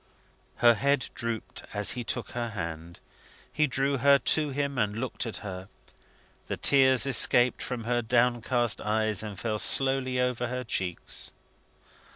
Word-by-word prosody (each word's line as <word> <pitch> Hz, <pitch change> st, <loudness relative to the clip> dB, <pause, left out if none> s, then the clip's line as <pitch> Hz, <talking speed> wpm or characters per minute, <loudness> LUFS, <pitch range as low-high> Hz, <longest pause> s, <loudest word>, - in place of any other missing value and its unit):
Her 120 Hz, -1 st, +4 dB
head 140 Hz, +3 st, -1 dB
drooped 115 Hz, -2 st, -6 dB
as 105 Hz, 0 st, +3 dB
he 125 Hz, -, -5 dB
took 115 Hz, -2 st, -5 dB
her 120 Hz, -1 st, -4 dB
hand. 85 Hz, -4 st, -7 dB, 0.5 s
He 155 Hz, 0 st, +1 dB
drew 135 Hz, +1 st, -1 dB
her 140 Hz, +2 st, +5 dB
to 150 Hz, +2 st, +2 dB
him, 140 Hz, -1 st, -3 dB
and 105 Hz, -2 st, -1 dB
looked 125 Hz, -1 st, -4 dB
at 115 Hz, -, -6 dB
her. 95 Hz, 0 st, -8 dB, 0.8 s
The -, -, -4 dB
tears 130 Hz, -2 st, +4 dB
escaped 125 Hz, -1 st, +4 dB
from 125 Hz, -3 st, -5 dB
her 120 Hz, +1 st, -1 dB
downcast 120 Hz, 0 st, 0 dB
eyes, 110 Hz, -1 st, -1 dB
and 105 Hz, -3 st, -8 dB
fell 110 Hz, -2 st, -3 dB
slowly 135 Hz, 0 st, +4 dB
over 125 Hz, -1 st, -1 dB
her 125 Hz, +1 st, -5 dB
cheeks. 95 Hz, -6 st, -3 dB
120 Hz, 150 wpm, -27 LUFS, 110-130 Hz, 0.8 s, her